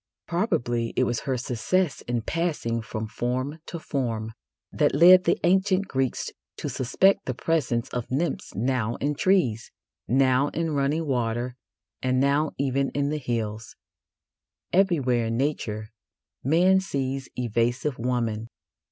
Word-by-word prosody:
Probably 120 Hz, -, 0 dB
it -, -, +3 dB
was 120 Hz, -2 st, 0 dB
her 130 Hz, -, +1 dB
success 135 Hz, +8 st, 0 dB
in 120 Hz, -2 st, -1 dB
passing 150 Hz, -9 st, -1 dB
from 110 Hz, 0 st, -5 dB
form 130 Hz, +7 st, -2 dB
to 170 Hz, -, -5 dB
form 115 Hz, -8 st, -3 dB, 0.4 s
that -, -, +2 dB
led 180 Hz, +4 st, +8 dB
the -, -, +3 dB
ancient 190 Hz, +2 st, +3 dB
Greeks 130 Hz, -4 st, -1 dB, 0.3 s
to -, -, -4 dB
suspect 160 Hz, +10 st, +2 dB
the 130 Hz, -, -2 dB
presence 135 Hz, -8 st, 0 dB
of 120 Hz, -2 st, -4 dB
nymphs 140 Hz, +4 st, -2 dB
now 120 Hz, +1 st, 0 dB
in 145 Hz, +1 st, -1 dB
trees, 140 Hz, -, +1 dB, 0.4 s
now 130 Hz, +2 st, +3 dB
in 165 Hz, -1 st, 0 dB
running 145 Hz, +3 st, 0 dB
water, 120 Hz, -2 st, -1 dB, 0.5 s
and 130 Hz, 0 st, +1 dB
now 140 Hz, +3 st, +2 dB
even 135 Hz, 0 st, 0 dB
in 140 Hz, 0 st, +1 dB
the 155 Hz, -, -1 dB
hills. 115 Hz, -3 st, -3 dB, 1.0 s
Everywhere 140 Hz, -11 st, +2 dB
in 115 Hz, 0 st, -1 dB
Nature 110 Hz, -6 st, -2 dB, 0.5 s
man 180 Hz, +7 st, +4 dB
sees 135 Hz, -7 st, -3 dB
evasive 120 Hz, +3 st, -1 dB
woman. 115 Hz, -2 st, -1 dB
130 Hz, 135 wpm, -26 LUFS, 120-155 Hz, 1.0 s, led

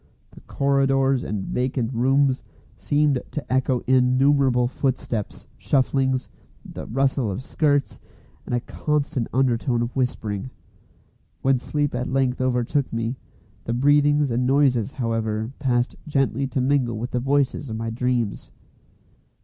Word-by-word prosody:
The -, -, -14 dB
corridors 135 Hz, -1 st, +1 dB
and 100 Hz, -3 st, -3 dB
vacant 125 Hz, -1 st, -1 dB
rooms 135 Hz, +2 st, +2 dB, 0.3 s
seemed 145 Hz, -3 st, +1 dB
to 150 Hz, -4 st, -4 dB
echo 130 Hz, -1 st, +1 dB
innumerable 130 Hz, 0 st, +3 dB
footsteps, 125 Hz, -5 st, -3 dB
shufflings, 130 Hz, -1 st, +1 dB, 0.4 s
the -, -, -8 dB
rustle 135 Hz, -1 st, 0 dB
of 100 Hz, +6 st, -4 dB
skirts, 145 Hz, -1 st, 0 dB, 0.5 s
and -, -, -1 dB
a 120 Hz, -, 0 dB
constant 140 Hz, -4 st, -2 dB
undertone 120 Hz, -1 st, +1 dB
of 120 Hz, -, -5 dB
whispering. 115 Hz, -4 st, -2 dB, 0.9 s
When 135 Hz, -1 st, +3 dB
sleep 145 Hz, +2 st, -1 dB
at 125 Hz, +1 st, -2 dB
length 130 Hz, -1 st, 0 dB
overtook 130 Hz, +2 st, 0 dB
me, 115 Hz, +2 st, -2 dB, 0.5 s
the 115 Hz, -, -1 dB
breathings 145 Hz, +2 st, +3 dB
and 125 Hz, +2 st, +1 dB
noises, 130 Hz, -5 st, +2 dB
however, 115 Hz, -2 st, -2 dB
passed 125 Hz, -3 st, 0 dB
gently 135 Hz, -2 st, 0 dB
to 130 Hz, 0 st, -1 dB
mingle 130 Hz, -4 st, +1 dB
with 120 Hz, +3 st, -4 dB
the 125 Hz, -, 0 dB
voices 140 Hz, +1 st, 0 dB
of 110 Hz, -, -4 dB
my 115 Hz, 0 st, -3 dB
dreams. 120 Hz, -2 st, -2 dB
130 Hz, 130 wpm, -23 LUFS, 120-135 Hz, 0.9 s, innumerable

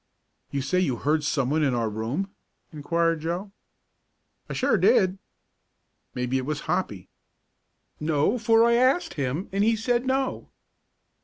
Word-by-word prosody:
"You 140 Hz, -1 st, -2 dB
say 180 Hz, +7 st, +1 dB
you 150 Hz, -9 st, +1 dB
heard 150 Hz, +5 st, 0 dB
someone 150 Hz, 0 st, 0 dB
in 135 Hz, -4 st, +2 dB
our 115 Hz, -2 st, 0 dB
room?" 115 Hz, -, -3 dB, 0.4 s
inquired 165 Hz, +2 st, 0 dB
Joe. 175 Hz, +5 st, -3 dB, 1.0 s
"I -, -, -4 dB
sure -, -, +2 dB
did." 190 Hz, 0 st, +3 dB, 1.0 s
"Maybe 125 Hz, +1 st, -1 dB
it 130 Hz, -, -4 dB
was 150 Hz, -1 st, -2 dB
Hoppy." 105 Hz, -, -2 dB, 0.9 s
"No, 155 Hz, +9 st, +1 dB
for 225 Hz, 0 st, +4 dB
I 235 Hz, -, +4 dB
asked 255 Hz, +8 st, +2 dB
him, 145 Hz, +5 st, -2 dB
and 195 Hz, +1 st, +1 dB
he 225 Hz, +1 st, +3 dB
said 240 Hz, +3 st, 0 dB
no." 265 Hz, 0 st, -1 dB
165 Hz, 140 wpm, -25 LUFS, 140-210 Hz, 1.0 s, for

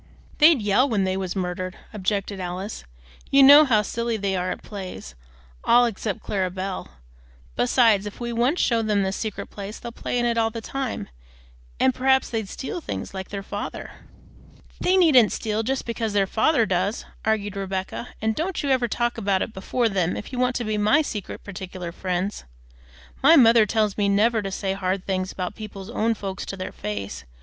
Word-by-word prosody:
"They'd 300 Hz, -6 st, +6 dB
yell 210 Hz, +7 st, +3 dB
when 210 Hz, -5 st, +1 dB
they 190 Hz, 0 st, 0 dB
was 190 Hz, -1 st, -3 dB
murdered," 185 Hz, 0 st, -3 dB, 0.2 s
objected 200 Hz, 0 st, -2 dB
Alice; 185 Hz, -, -5 dB, 0.4 s
"you 275 Hz, 0 st, +6 dB
know 290 Hz, +3 st, +10 dB
how 220 Hz, -6 st, +3 dB
silly 235 Hz, +2 st, -2 dB
they 200 Hz, -2 st, -1 dB
are 180 Hz, 0 st, -1 dB
at -, -, -5 dB
plays, 190 Hz, -, -8 dB, 0.5 s
all 245 Hz, +1 st, +5 dB
except 215 Hz, -3 st, -3 dB
Clara 190 Hz, -2 st, -1 dB
Belle. 190 Hz, +1 st, -5 dB, 0.7 s
Besides 210 Hz, -, +3 dB
if 205 Hz, -, -9 dB
we 240 Hz, -1 st, -3 dB
once 245 Hz, +9 st, +1 dB
show 230 Hz, -2 st, +2 dB
them 210 Hz, -2 st, +1 dB
this 190 Hz, 0 st, -1 dB
secret 215 Hz, -3 st, -5 dB
place, 200 Hz, +1 st, -7 dB
they'll 235 Hz, -, -7 dB
play 245 Hz, -, -3 dB
in 240 Hz, -, +1 dB
it 235 Hz, -1 st, +1 dB
all 225 Hz, 0 st, +2 dB
the 230 Hz, +1 st, -6 dB
time, 260 Hz, -, -4 dB, 0.7 s
and 260 Hz, -, +4 dB
perhaps 265 Hz, +1 st, +2 dB
they'd 220 Hz, -4 st, -2 dB
steal 340 Hz, +6 st, -5 dB
things, -, -, -5 dB
like 190 Hz, -1 st, -6 dB
their 200 Hz, -1 st, -5 dB
father." 205 Hz, +1 st, -6 dB, 0.9 s
"They 370 Hz, +1 st, +3 dB
needn't 275 Hz, -, +6 dB
steal 215 Hz, -1 st, -1 dB
just 260 Hz, +4 st, -2 dB
because 230 Hz, -2 st, -2 dB
their 200 Hz, -1 st, +3 dB
father 230 Hz, +5 st, +2 dB
does," 185 Hz, +3 st, -1 dB, 0.2 s
argued 210 Hz, -2 st, 0 dB
Rebecca; 195 Hz, +4 st, -4 dB
"and 220 Hz, 0 st, +2 dB
don't 335 Hz, -, -2 dB
you 280 Hz, -, 0 dB
ever 255 Hz, -2 st, +2 dB
talk 240 Hz, +1 st, -1 dB
about 195 Hz, -3 st, +1 dB
it 220 Hz, -, -7 dB
before 230 Hz, +5 st, 0 dB
them 185 Hz, -4 st, 0 dB
if 210 Hz, -, -8 dB
you 250 Hz, -, -3 dB
want 250 Hz, 0 st, +1 dB
to 240 Hz, -, -1 dB
be 215 Hz, -1 st, -1 dB
my 245 Hz, +10 st, +4 dB
secret, 210 Hz, -9 st, -6 dB
partic'lar 185 Hz, -3 st, -7 dB
friends. 185 Hz, +3 st, -3 dB, 0.8 s
My 315 Hz, +5 st, +7 dB
mother 230 Hz, -5 st, +6 dB
tells 215 Hz, -2 st, +1 dB
me 200 Hz, -1 st, +2 dB
never 220 Hz, +3 st, +3 dB
to 195 Hz, -, -4 dB
say 190 Hz, 0 st, -2 dB
hard 190 Hz, -1 st, -2 dB
things 185 Hz, -1 st, -1 dB
about 180 Hz, -1 st, -4 dB
people's 200 Hz, -3 st, -8 dB
own 225 Hz, +1 st, +1 dB
folks 195 Hz, -2 st, -5 dB
to 195 Hz, -, -5 dB
their 185 Hz, -, -5 dB
face. 100 Hz, -5 st, -5 dB
210 Hz, 195 wpm, -24 LUFS, 190-235 Hz, 0.9 s, know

